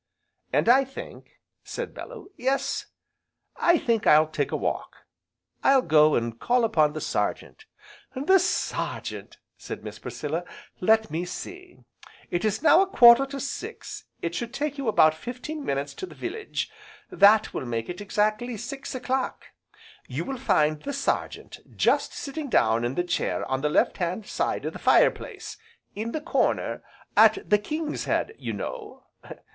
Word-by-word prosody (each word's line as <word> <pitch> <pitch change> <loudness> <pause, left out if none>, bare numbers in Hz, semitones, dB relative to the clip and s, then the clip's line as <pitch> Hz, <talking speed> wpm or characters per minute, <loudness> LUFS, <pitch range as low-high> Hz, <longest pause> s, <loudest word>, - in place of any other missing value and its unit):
"And - - +1
I 260 +3 +6
think," 270 0 -11 0.2
said - - -6
Bellew, 425 -6 -10
"Yes, 265 +2 -1 0.7
I 345 0 +4
think 230 -7 0
I'll 155 +1 +7
take 155 - -2
a - - -1
walk. - - -3 0.7
I'll 270 -1 +5
go 155 -1 +5
and 115 0 -2
call 245 0 +2
upon 155 -10 +3
the 155 - -4
Sergeant." 435 - -3 0.5
"The 335 +9 +4
Sergeant!" 370 - -3 0.2
said - - -7
Miss - - -8
Priscilla, 155 +3 -4 0.4
"let 220 -2 +3
me 165 +3 -2
see, 365 - -8 0.5
it 175 - -1
is 215 +5 -1
now 320 +3 +7
a 390 - +2
quarter 245 -6 +7
to 275 0 -6
six, 380 - -6 0.2
it 170 - -2
should 235 +7 -4
take 290 0 -2
you 270 - -3
about 155 -7 +5
fifteen 255 - -6
minutes 140 - -2
to 375 - -7
the - - -13
village, 410 +5 -4 0.4
that 205 +2 +5
will 130 - -4
make 115 -1 -3
it 180 +3 -6
exactly 215 +3 0
six 270 +4 -6
o'clock. 260 +1 -2 0.6
You - - -4
will 270 -2 -5
find 155 - +2
the 285 - -4
Sergeant 275 0 -3 0.2
just - - +2
sitting 280 +1 -5
down 115 - +3
in 120 +2 -2
the 175 - +1
chair 175 - -1
on 130 0 -2
the 150 - +1
left - - +2
hand 185 +4 -2
side - - -2
of - - -3
the - - -8
fire - - +5
place, - - -9 0.4
in 220 +3 -4
the 310 - -3
corner, 335 - 0 0.3
at 395 - +5
the 210 - +4
'King's 305 +7 -4
Head,' 440 - 0
you - - -4
know. 440 -4 -7
235 Hz, 160 wpm, -26 LUFS, -, 0.7 s, I'll